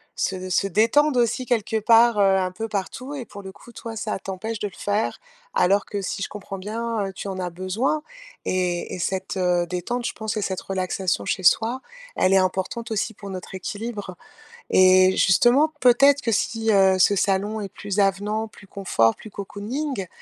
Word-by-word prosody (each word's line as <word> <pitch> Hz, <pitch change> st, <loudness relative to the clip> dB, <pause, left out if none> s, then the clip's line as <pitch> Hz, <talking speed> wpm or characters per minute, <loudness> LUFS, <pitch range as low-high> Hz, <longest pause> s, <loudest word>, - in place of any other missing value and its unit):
se 185 Hz, -1 st, -2 dB
se 195 Hz, -, +1 dB
détendent 230 Hz, -, +3 dB
aussi, 240 Hz, +1 st, +1 dB
quelque 225 Hz, -2 st, 0 dB
part, 230 Hz, 0 st, +5 dB
heu, -, -, +5 dB, 0.2 s
un 185 Hz, -1 st, 0 dB
peu 220 Hz, +5 st, -5 dB
partout 225 Hz, +7 st, -4 dB
et 260 Hz, -4 st, -6 dB
pour 200 Hz, -1 st, -10 dB
le 190 Hz, -1 st, -9 dB
coup, 240 Hz, +5 st, -16 dB
toi, 230 Hz, -1 st, -8 dB
ça 215 Hz, -2 st, -3 dB
t'empêche 195 Hz, +4 st, -5 dB
de 205 Hz, -, -2 dB
le 195 Hz, -, -12 dB
faire, 205 Hz, +2 st, -1 dB, 0.4 s
alors 200 Hz, -, +3 dB
que, 205 Hz, -, -4 dB
si 195 Hz, -, -4 dB
je -, -, -1 dB
comprends 195 Hz, -1 st, -8 dB
bien, 220 Hz, +2 st, -3 dB
heu, 195 Hz, -, -7 dB
tu 200 Hz, +1 st, -6 dB
en 190 Hz, -1 st, -5 dB
as 180 Hz, -1 st, -2 dB
besoin 185 Hz, -, -1 dB, 0.4 s
et 180 Hz, -2 st, -1 dB
et -, -, -5 dB
cette, 190 Hz, +2 st, -2 dB
heu, 180 Hz, -1 st, +2 dB
détente, 180 Hz, +8 st, -3 dB
je -, -, -1 dB
pense 220 Hz, -2 st, -4 dB
que 215 Hz, -, -1 dB
cette 190 Hz, -2 st, -2 dB
relaxation 185 Hz, -, -2 dB
chez 185 Hz, -, -2 dB
soi, 230 Hz, +8 st, +3 dB, 0.4 s
elle 185 Hz, -, +3 dB
est -, -, +6 dB
importante 190 Hz, +5 st, -1 dB
aussi 220 Hz, +1 st, -1 dB
pour 200 Hz, -1 st, -10 dB
notre 185 Hz, 0 st, -7 dB
équilibre 205 Hz, 0 st, -5 dB, 0.5 s
et 185 Hz, 0 st, +6 dB
justement, 250 Hz, -, +4 dB
peut-être 275 Hz, +3 st, +5 dB
que 230 Hz, -, -1 dB
si, 225 Hz, +1 st, 0 dB
heu, 190 Hz, -2 st, +5 dB
ce 195 Hz, +2 st, +4 dB
salon 200 Hz, +3 st, 0 dB
est 205 Hz, -, -4 dB
plus 200 Hz, +1 st, -4 dB
avenant, 205 Hz, +3 st, +1 dB
plus 210 Hz, -1 st, -17 dB
confort, 175 Hz, -, +1 dB
plus 215 Hz, -, -11 dB
cocooning, 205 Hz, +4 st, -4 dB
200 Hz, 195 wpm, -23 LUFS, 185-225 Hz, 0.5 s, est